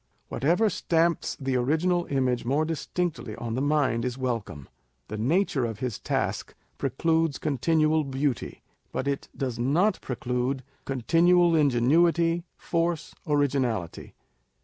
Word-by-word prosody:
Whatever 170 - +2
stamps 170 -3 0
the 135 -2 -1
original 165 +7 +1
image 130 -3 0
more 140 +6 +1
distinctly 160 -6 -3
on 115 -1 -5
the 130 - -1
mind, 145 -5 +1
is 125 0 -3
welcome. 115 - -3 0.4
The 110 - -4
nature 145 - +1
of 115 -3 -3
his 125 -2 -3
task - - -2 0.2
precludes 160 +3 +1
continual 155 +2 +1
beauty; 135 -3 -2 0.3
but 135 - -3
it 140 -1 -2
does 125 -3 -3
not 160 - +2
pre 125 - -4
clude 125 +2 -1 0.2
continual 170 +7 +3
ingenuity, 165 +5 +3
force, 170 -1 -1
originality. 130 - -1
140 Hz, 125 wpm, -26 LUFS, 125-165 Hz, 0.4 s, continual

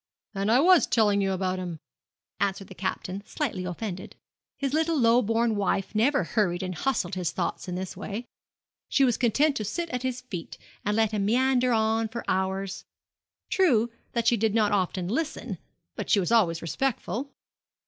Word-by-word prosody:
'And 200 +1 0
I 245 - +6
was 360 +4 +6
telling 205 -3 +3
you 195 -1 +1
about 185 0 -1
him,' 175 -3 -5 0.6
answered 195 0 -1
the - - -9
Captain, 185 +1 -4
slightly 210 -7 -3
offended. 185 +1 -5 0.4
His 275 -1 -2
little 320 +1 +2
low 235 -1 +5
born 225 +1 +1
wife 195 -1 0
never 265 +7 +3
hurried 185 -5 0
and 185 0 -3
hustled 195 -2 -1
his 180 -2 -1
thoughts - - -3
in 180 - -3
this 185 0 -5
way. 210 +4 -5 0.6
She 275 - +3
was 245 -4 +4
content 275 +5 +3
to 215 - -2
sit 335 - -3
at 250 - -2
his 255 -1 -2
feet, 185 -10 -7 0.3
and 210 +1 0
let 220 -1 +3
him 205 -2 0
meander 255 +2 +3
on 225 0 +2
for 235 +2 -6
hours. 190 +1 -1 0.7
True 240 - +3 0.2
that 235 -1 0
she 235 0 +4
did 220 0 +1
not 215 -2 +3
often 185 -2 0
listen, 310 - -3 0.4
but - - -5
she 205 - +5
was 185 +3 -1
always 175 -8 +3
respectful. 255 - -2
215 Hz, 180 wpm, -27 LUFS, 190-250 Hz, 0.7 s, I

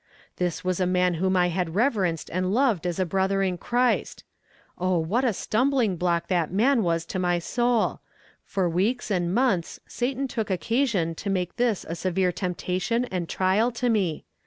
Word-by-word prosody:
This 180 -2 -2
was 185 0 -1
a 185 - +2
man 180 0 +2
whom 190 0 +2
I 180 0 +3
had 175 -1 -2
reverenced 200 - 0
and 185 +1 0
loved 225 - +2
as 175 - -2
a 185 - +1
brother 195 +2 +1
in 180 -2 -1
Christ. 245 +4 0 0.6
Oh, 185 0 +1
what 185 +11 0
a 250 - +3
stumbling 235 0 +1
block 170 -1 0
that 175 -4 0
man 235 +6 +3
was 165 -3 0
to 185 - -4
my 175 -1 +1
soul; 240 +5 0 0.4
for 190 -2 -1
weeks 210 +8 0
and 175 -3 0
months 200 -6 +1
Satan 265 +3 -2
took 225 -4 -3
occasion 200 -3 0
to 200 +5 -5
make 180 -2 -1
this 235 -5 0
a 165 - -4
severe 185 +1 0
temptation 185 +6 -1
and 180 -3 -3
trial 195 +5 +2
to 245 +1 -1
me. 190 -8 0
185 Hz, 180 wpm, -25 LUFS, 175-230 Hz, 0.6 s, I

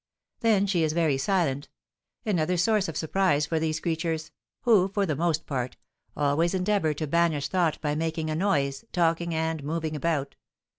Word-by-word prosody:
Then 215 -4 +3
she 190 -4 +1
is 155 -1 +1
very 155 -5 +2
silent, 145 -5 0 0.6
another 180 -4 +1
source 210 +2 +2
of 165 - -4
surprise 160 -3 +1
for 160 +2 -1
these 155 -1 -1
creatures, 160 -1 -2 0.3
who, 215 -6 +4
for 200 +1 0
the 155 -5 -1
most 160 +1 0
part, 130 -3 -3 0.4
always 150 +5 +2
endeavour 185 -5 +1
to 155 - -3
banish 160 -2 +1
thought 175 -5 +1
by 150 -1 0
making 160 0 -2
a - - -1
noise, 140 -7 0
talking, 170 -1 +1
and 160 -2 -1
moving 155 +1 -2
about. 150 -2 -1
160 Hz, 165 wpm, -27 LUFS, 150-180 Hz, 0.6 s, who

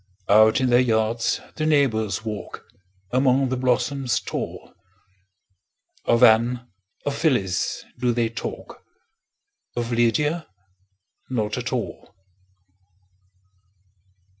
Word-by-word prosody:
Out 110 +2 +6
in 130 -1 +1
their 120 - +6
yards 115 -1 +1 0.2
the 155 - -1
neighbors 115 -8 +1
walk, 105 -2 -6 0.5
Among 130 +1 +3
the 130 - -1
blossoms 125 +1 0
tall; - - -6 1.3
Of 115 +1 +3
Anne, 120 +2 +4 0.4
of 145 - -1
Phyllis, 120 - 0
do 125 -1 +2
they 120 -1 +1
talk, 115 - -7 0.9
Of 120 0 -3
Lydia 145 +8 +1 0.8
not 110 -5 -1
at - - -4
all. - - -5
120 Hz, 95 wpm, -23 LUFS, 110-130 Hz, 1.3 s, Out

